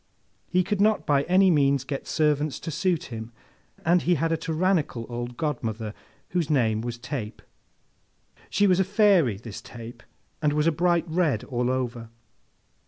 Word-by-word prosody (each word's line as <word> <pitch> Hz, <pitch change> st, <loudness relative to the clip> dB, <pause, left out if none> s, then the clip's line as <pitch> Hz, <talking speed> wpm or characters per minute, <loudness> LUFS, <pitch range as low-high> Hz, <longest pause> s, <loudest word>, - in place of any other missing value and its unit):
He 185 Hz, 0 st, +2 dB
could 200 Hz, +2 st, -1 dB
not 215 Hz, +1 st, +3 dB
by 140 Hz, -2 st, +3 dB
any 185 Hz, +1 st, +5 dB
means 140 Hz, -3 st, +3 dB
get 135 Hz, 0 st, -5 dB
servants 150 Hz, -2 st, +1 dB
to 165 Hz, -, -5 dB
suit 170 Hz, +1 st, 0 dB
him, 110 Hz, +1 st, -6 dB, 0.5 s
and 175 Hz, +2 st, +4 dB
he 175 Hz, -, +2 dB
had 165 Hz, +2 st, 0 dB
a -, -, +3 dB
tyrannical 160 Hz, -7 st, 0 dB
old 120 Hz, 0 st, -5 dB
godmother, 115 Hz, -8 st, -3 dB, 0.4 s
whose 170 Hz, -4 st, -1 dB
name 110 Hz, -7 st, +2 dB
was 120 Hz, 0 st, -4 dB
Tape. 120 Hz, -4 st, -5 dB, 1.1 s
She 205 Hz, -, +2 dB
was 185 Hz, -2 st, +4 dB
a -, -, +5 dB
Fairy, 190 Hz, -, +3 dB
this 110 Hz, 0 st, -9 dB
Tape, 115 Hz, 0 st, -10 dB, 0.4 s
and 150 Hz, -2 st, +2 dB
was 150 Hz, 0 st, +1 dB
a 165 Hz, -, +4 dB
bright 170 Hz, +1 st, +1 dB
red 160 Hz, -9 st, +1 dB
all 125 Hz, -2 st, -1 dB
over. 120 Hz, -3 st, -3 dB
150 Hz, 165 wpm, -26 LUFS, 120-175 Hz, 1.1 s, any